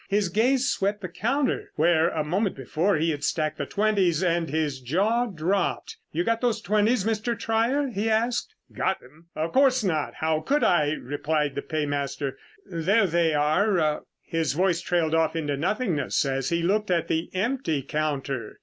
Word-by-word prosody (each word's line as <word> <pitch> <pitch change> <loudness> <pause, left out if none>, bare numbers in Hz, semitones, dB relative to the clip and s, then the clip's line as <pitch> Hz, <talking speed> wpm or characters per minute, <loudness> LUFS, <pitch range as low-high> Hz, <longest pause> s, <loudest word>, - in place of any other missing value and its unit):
His 200 -2 +1
gaze 250 +7 +2
swept 200 -2 0
the 185 - -4
counter 260 +10 -1
where, 165 +1 +3
a 155 - -2
moment 190 +6 0
before, 160 +9 0
he 160 +2 +1
had 145 -1 -5
stacked 155 0 -1
the 140 - -2
twenties, 195 -5 +1
and 170 -2 +1
his 150 -2 -1
jaw 205 - +1
dropped. 185 0 -1 0.2
"You 170 +3 0
got 230 +3 0
those 235 -3 +1
twenties, 215 +2 +1
Mr. 225 +1 -1
Trier?" 235 +7 +1
he 220 -1 -1
asked. 235 - 0 0.2
"Got 190 - 0
them? 155 +6 -19
Of 160 +2 -2
course 260 -2 +4
not, 160 -6 -1
how 160 -1 0
could 285 - 0
I?" 155 -4 +3
replied 150 +1 -2
the 140 - -3
paymaster. 145 -2 -2 0.3
"There 190 +6 +2
they 165 -3 +2
are...." 155 +1 +2 0.2
His 165 -3 -1
voice 180 +1 +1
trailed 170 -2 0
off 160 0 +2
into 150 -3 -1
nothingness 170 - 0
as 135 -1 -1
he 170 0 0
looked 210 +4 +1
at 175 -2 +1
the 160 +1 -1
empty 190 - -1
counter. 140 -5 -3
170 Hz, 170 wpm, -25 LUFS, 155-215 Hz, 0.3 s, course